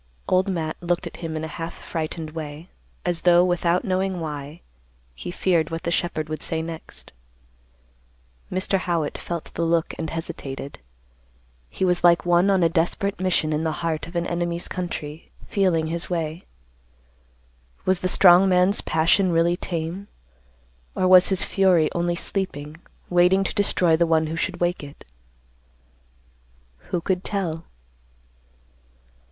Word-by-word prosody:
Old 185 +2 +2
Matt 160 -4 -2
looked 175 0 -1
at - - -8
him 160 -2 -4
in 155 - -4
a - - -3
half 165 +1 -4
frightened 160 -1 -5
way, 155 +2 -7 0.4
as 175 -2 -1
though, 175 0 +5
without 175 +2 +1
knowing 190 -1 0
why, 150 0 -6 0.5
he 65 - -7
feared 175 -2 +1
what 165 0 -5
the 170 - -1
shepherd 160 -2 -1
would 155 0 -5
say 160 - -2
next. 165 - -8 1.4
Mr. 185 +1 0
Howitt 170 -5 -1
felt 170 -2 -6
the - - -3
look 165 0 +1
and 160 -1 -3
hesitated. 145 -4 -6 0.9
He 190 - -1
was 180 -1 +1
like 170 0 +5
one 175 +2 +4
on 190 -3 +3
a - - +6
desperate 175 +4 0
mission 175 -4 +1
in 150 +1 -1
the 160 -1 0
heart 160 -2 -2
of 170 - -12
an 170 0 0
enemy's 175 0 -2
country, 160 -4 -5 0.2
feeling 180 -5 +1
his 165 +1 -4
way. 165 -1 -3 1.4
Was 185 -1 +2
the 185 - -1
strong 180 +1 +7
man's 185 +2 +3
passion 175 +4 +2
really 170 +1 +3
tame? 175 +3 -4 0.9
Or 185 - +2
was 185 0 +7
his 190 -2 +2
fury 180 -5 +3
only 175 0 0
sleeping, 160 -5 -3 0.3
waiting 180 +2 +4
to - - -2
destroy 180 -5 +3
the 170 +1 +2
one 160 -1 +3
who 160 +1 -4
should 175 +2 -2
wake 175 -2 0
it? 140 0 -12 1.8
Who 175 - -1
could 185 +1 -1
tell? 170 -5 -3
170 Hz, 150 wpm, -23 LUFS, 160-185 Hz, 1.8 s, strong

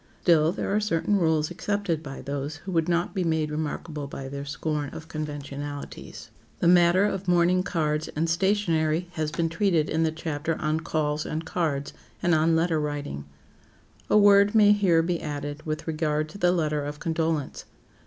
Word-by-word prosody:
Still, 160 -2 +4
there 195 +2 -2
are - - +3
certain 205 -1 0
rules 160 -3 +1
accepted 190 -3 -2
by 135 -3 -8
those 140 +2 -4
who 190 +5 -8
would 165 -1 +1
not 170 0 0
be 190 -3 -1
made 160 -2 0
remarkable 150 -1 -4
by 135 -1 -7
their 140 +1 -6
scorn 145 0 -3
of 160 +3 -9
conventionalities. 145 -2 -7 0.3
The - - +1
matter 175 +2 +5
of 195 -2 -2
mourning 180 +1 +3
cards 155 -3 -1
and 160 +2 0
stationery 170 -2 +1
has 155 -3 -2
been 165 +1 0
treated 165 -2 +1
in 160 - +1
the 160 -1 +2
chapter 160 0 -3
on 155 +1 0
"Calls 155 -2 -1
and 160 +2 -4
Cards," 150 -5 -2 0.3
and 175 - +3
on 160 +1 +3
"Letter 165 -1 +1
Writing." 145 - -4 0.8
A - - +5
word 205 0 +6
may 210 -1 +7
here 185 -6 +4
be 170 0 -1
added 145 0 -5
with 155 0 -3
regard 155 -1 -1
to 200 - -11
the 175 -1 +4
letter 155 -4 0
of 145 +1 -5
condolence. 160 -3 -2
160 Hz, 175 wpm, -26 LUFS, 150-175 Hz, 0.8 s, may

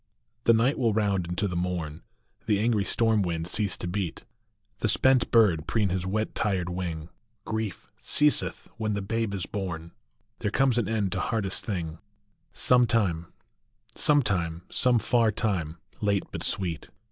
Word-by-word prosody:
HE 115 - +8
night 120 +6 +2
will 115 -4 +2
round 100 -5 +1
into 90 +4 -1
the 90 - -4
morn, 85 -3 -3 0.5
The 105 -3 +2
angry 110 -2 +2
storm 110 0 +2
wind 85 -3 -2
cease 100 +1 +1
to - - -4
beat, 90 -2 -3 0.5
The - - 0
spent 130 -2 +3
bird 100 -10 +4
preen 105 -4 +1
his 90 0 -2
wet 110 +3 -1
tired 95 -5 -1
wing, 85 -3 -4 0.4
Grief 110 -3 -4
ceaseth 150 0 +3
when 110 -2 -1
the 100 - -3
babe 115 +1 -1
is 95 -3 -3
born. 85 -5 -5 0.5
There 105 - -1
comes 125 +1 +2
an 115 - -1
end 105 -4 0
to 95 - -2
hardest 100 -2 -1
thing 85 -6 -4 0.5
Some 125 -1 +4
time, 90 -8 0 0.7
Some 145 -2 +3
time, 85 -5 -1
some 125 -1 +3
far 115 0 +2
time, 90 -7 -2 0.2
late 100 -2 +1
but - - -5
sweet. 85 -5 -2
100 Hz, 160 wpm, -27 LUFS, 90-115 Hz, 0.7 s, HE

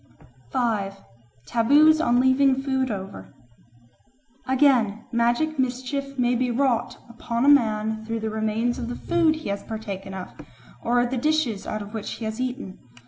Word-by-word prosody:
5. 205 - -1 0.5
Taboos 295 +7 +4
on 245 -5 +3
Leaving 260 +1 +4
Food 265 -1 0
over 195 -2 -7 1.1
AGAIN, 255 -6 +2
magic 240 +6 +1
mischief 260 +2 -2
may 245 -1 +2
be 250 +1 0
wrought 245 -1 0
upon 235 +1 -2
a - - +2
man 220 -5 +3
through 225 0 -4
the 220 0 -2
remains 220 +2 -1
of 235 - -4
the 245 - -4
food 335 -2 +2
he 310 -8 -6
has 200 0 -2
partaken 200 -3 -6
of, 185 -1 -6 0.5
or 245 +1 +2
the 255 +1 -2
dishes 270 -7 0
out 215 -1 -3
of 205 +2 -12
which 220 -2 -4
he 225 - -6
has 220 +3 -4
eaten. 250 -6 -5
240 Hz, 155 wpm, -24 LUFS, 220-265 Hz, 1.1 s, Taboos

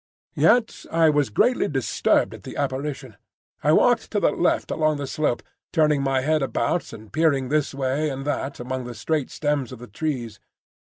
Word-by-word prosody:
Yet 240 -2 +2
I 165 -1 +4
was 145 -4 +1
greatly 245 - +2
disturbed 130 -8 +1
at - - -10
the - - -9
apparition. 135 -4 -3 0.5
I - - +4
walked - - +3
to - - 0
the - - +3
left - - 0
along 155 -1 +1
the 145 - -4
slope, 140 -3 -1 0.3
turning 150 -3 +3
my 135 -1 +1
head 155 +3 +1
about 135 +4 -1
and 110 -1 -12
peering 145 -5 +2
this 150 0 +1
way 140 +3 0
and 135 0 -5
that 145 -1 -3
among 130 +1 -4
the 120 -1 -7
straight 150 +4 -1
stems 145 -4 -1
of 130 - -8
the 120 - -10
trees. 120 -3 -4
140 Hz, 185 wpm, -24 LUFS, 130-155 Hz, 0.5 s, I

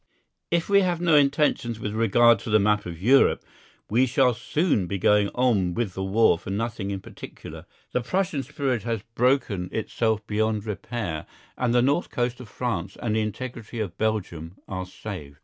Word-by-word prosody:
If 170 -1 +1
we 200 0 +5
have 180 -3 0
no 170 -3 +3
intentions 140 -5 +2
with 105 -1 -4
regard 115 +1 +4
to 110 - -7
the 110 - +5
map 105 -1 +1
of 85 -2 -7
Europe, 130 +8 +4 0.4
we 125 +5 +3
shall 130 0 +3
soon 130 - 0
be 100 - -2
going 105 +2 +3
on 105 -9 +2
with 115 -6 -1
the 95 - -4
war 95 -2 +3
for - - -9
nothing 105 0 -3
in 100 -1 -4
particular. - - -10 0.2
The 125 - 0
Prussian 170 +2 -1
spirit 135 -4 -2
has 115 -1 -3
broken 115 -7 +1
itself 110 -1 -1
beyond 110 0 -1
repair, 105 -5 -4 0.3
and 125 -2 0
the 120 0 +4
north 145 +6 +1
coast 120 0 -2
of 125 -4 -10
France 100 -6 -3
and 110 -2 -1
the 110 - +2
integrity 115 +2 -5
of 100 -6 -3
Belgium 90 -6 -2
are 95 -1 -5
saved. 90 -8 -8
110 Hz, 180 wpm, -25 LUFS, 100-125 Hz, 0.4 s, we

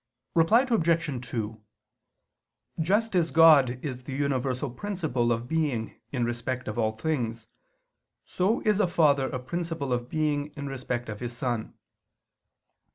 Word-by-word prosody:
Reply 210 +10 +5
Obj. 165 - +1
2: 110 -2 -4 1.2
Just 205 +6 +1
as 170 -2 +3
God 150 -6 +6
is 130 -3 -4
the 130 - -5
universal 135 -1 -1
principle 135 -7 -1
of 115 +1 -1
being 145 -8 -1
in 125 -4 0
respect 120 +2 -3
of 110 +2 -3
all 110 -1 +1
things, 115 -3 -2 0.8
so 195 +5 0
is 210 -2 +2
a 205 - +3
father 145 -6 +3
a - - -3
principle 145 0 -3
of 120 0 -2
being 150 -1 -1
in 140 - -5
respect 125 -3 -4
of 110 -1 -6
his 120 -1 -5
son. 120 -3 -2
135 Hz, 140 wpm, -27 LUFS, 120-165 Hz, 1.2 s, God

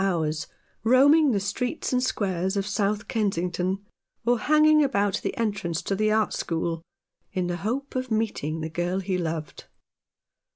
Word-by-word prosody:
hours 160 -5 0 0.4
roaming 280 +6 +6
the 215 -5 +2
streets 245 +9 -2
and 250 - +3
squares 190 -5 -1
of 195 - 0
South 205 0 -1
Kensington, 190 -2 -1 0.4
or 240 0 +3
hanging 305 +3 +5
about 205 -8 +1
the - - -3
entrance 200 -8 -1
to 195 - -1
the 215 +2 +2
art 215 -1 +2
school, 165 0 -2 0.5
in 185 -1 0
the 175 0 -2
hope 245 +10 -3
of 255 0 -2
meeting 205 -8 -1
the 160 - -3
girl 175 +3 -1
he 190 0 -2
loved. 160 -4 -4
200 Hz, 155 wpm, -26 LUFS, 175-235 Hz, 0.5 s, roaming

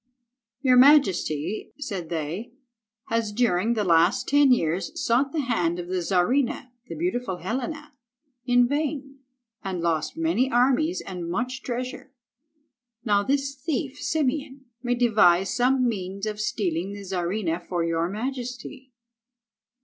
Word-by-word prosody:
"Your 255 -2 +4
majesty," 200 - +3
said 195 - -5
they, 170 +8 -4 0.6
"has 225 -2 0
during 225 -1 +1
the 215 - 0
last 170 0 +3
ten 285 -1 +5
years 185 - +1
sought 270 0 +1
the 310 - -1
hand 175 -10 0
of 175 0 -6
the 185 -1 -1
Czarina, 235 +9 0 0.2
the - - -6
beautiful 250 - -2
Helena, 270 - -4 0.5
in 245 -1 +4
vain, 280 -1 -3 0.4
and 190 -3 -3
lost 165 - -1
many 320 -6 +1
armies 270 +8 +2
and 180 -3 -6
much 250 +7 -2
treasure. 255 +2 -5 0.9
Now 205 -2 +3
this 275 +4 0
thief, 285 0 -4
Simeon, 285 -2 -2 0.2
may 245 0 0
devise 205 -6 +4
some 255 +1 +3
means 195 -2 -3
of 210 -1 -3
stealing 190 -3 -2
the 205 0 -8
Czarina 180 -1 -2
for 175 -1 -3
your 165 +1 0
Majesty." 250 +3 -6
235 Hz, 130 wpm, -25 LUFS, 180-270 Hz, 0.9 s, ten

